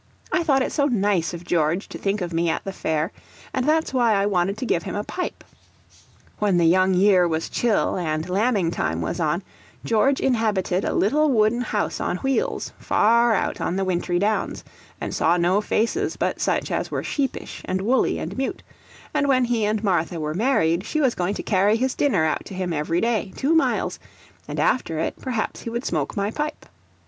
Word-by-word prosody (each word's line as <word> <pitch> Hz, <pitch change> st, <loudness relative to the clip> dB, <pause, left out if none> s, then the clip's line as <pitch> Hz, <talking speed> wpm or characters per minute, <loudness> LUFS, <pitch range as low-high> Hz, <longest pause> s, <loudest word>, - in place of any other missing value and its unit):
I 365 Hz, -, +2 dB
thought 275 Hz, -5 st, +3 dB
it -, -, -3 dB
so 285 Hz, -, +1 dB
nice 205 Hz, -, +1 dB
of 170 Hz, 0 st, -7 dB
George 170 Hz, +2 st, 0 dB
to -, -, -7 dB
think 200 Hz, +1 st, -1 dB
of 175 Hz, -1 st, -3 dB
me 165 Hz, +1 st, +1 dB
at 160 Hz, -, -1 dB
the 195 Hz, -, -5 dB
fair, 160 Hz, +1 st, -1 dB, 0.4 s
and 260 Hz, +1 st, -1 dB
that's 315 Hz, -2 st, +1 dB
why 240 Hz, -4 st, +3 dB
I 195 Hz, 0 st, +2 dB
wanted 195 Hz, 0 st, 0 dB
to 255 Hz, -, -3 dB
give 170 Hz, -, +1 dB
him -, -, -5 dB
a 205 Hz, -, -2 dB
pipe. 360 Hz, +10 st, -5 dB, 1.0 s
When 205 Hz, -4 st, +2 dB
the 170 Hz, -, +3 dB
young 185 Hz, +2 st, +4 dB
year 185 Hz, -1 st, +5 dB
was 160 Hz, -1 st, -2 dB
chill 230 Hz, -5 st, +1 dB
and 155 Hz, -2 st, -2 dB
lambing 195 Hz, -2 st, +1 dB
time -, -, -2 dB
was -, -, -3 dB
on, -, -, 0 dB, 0.4 s
George 250 Hz, +5 st, +2 dB
inhabited 210 Hz, -7 st, +1 dB
a -, -, -1 dB
little 300 Hz, +9 st, +3 dB
wooden 225 Hz, -1 st, +2 dB
house 215 Hz, -3 st, -2 dB
on 180 Hz, -, -1 dB
wheels, 270 Hz, -, -1 dB
far 235 Hz, +1 st, +3 dB
out -, -, -2 dB
on 175 Hz, -, -1 dB
the 195 Hz, 0 st, 0 dB
wintry 175 Hz, -1 st, 0 dB
downs, 210 Hz, +4 st, -1 dB, 0.4 s
and -, -, -4 dB
saw 170 Hz, +2 st, +2 dB
no 180 Hz, +4 st, +2 dB
faces 220 Hz, +2 st, 0 dB
but -, -, -1 dB
such -, -, 0 dB
as -, -, -1 dB
were -, -, -3 dB
sheepish 275 Hz, -3 st, -3 dB
and 185 Hz, -, -1 dB
woolly 245 Hz, +6 st, +2 dB
and -, -, -5 dB
mute; 265 Hz, 0 st, -3 dB, 0.5 s
ant 285 Hz, -, +1 dB
when 255 Hz, -2 st, +3 dB
he 235 Hz, -3 st, 0 dB
and 215 Hz, +1 st, -1 dB
Martha 175 Hz, -4 st, 0 dB
were 155 Hz, 0 st, -2 dB
married, 185 Hz, -5 st, +2 dB
she 310 Hz, -, -2 dB
was 265 Hz, -5 st, +3 dB
going 180 Hz, +3 st, -1 dB
to -, -, -5 dB
carry 205 Hz, +1 st, +3 dB
his 260 Hz, +2 st, 0 dB
dinner 200 Hz, -, +2 dB
out 155 Hz, -, -1 dB
to 195 Hz, -, -8 dB
him 185 Hz, -2 st, -2 dB
every 165 Hz, +3 st, 0 dB
day, 225 Hz, -4 st, 0 dB
two 285 Hz, +4 st, +1 dB
miles; 325 Hz, -, +1 dB, 0.5 s
and -, -, -4 dB
after 165 Hz, -10 st, +1 dB
it, 160 Hz, -, -3 dB
perhaps 245 Hz, -5 st, -2 dB
he -, -, -5 dB
would 235 Hz, +2 st, -4 dB
smoke 150 Hz, 0 st, -2 dB
my 200 Hz, +1 st, 0 dB
pipe. 300 Hz, +4 st, -4 dB
205 Hz, 205 wpm, -23 LUFS, 175-245 Hz, 1.0 s, year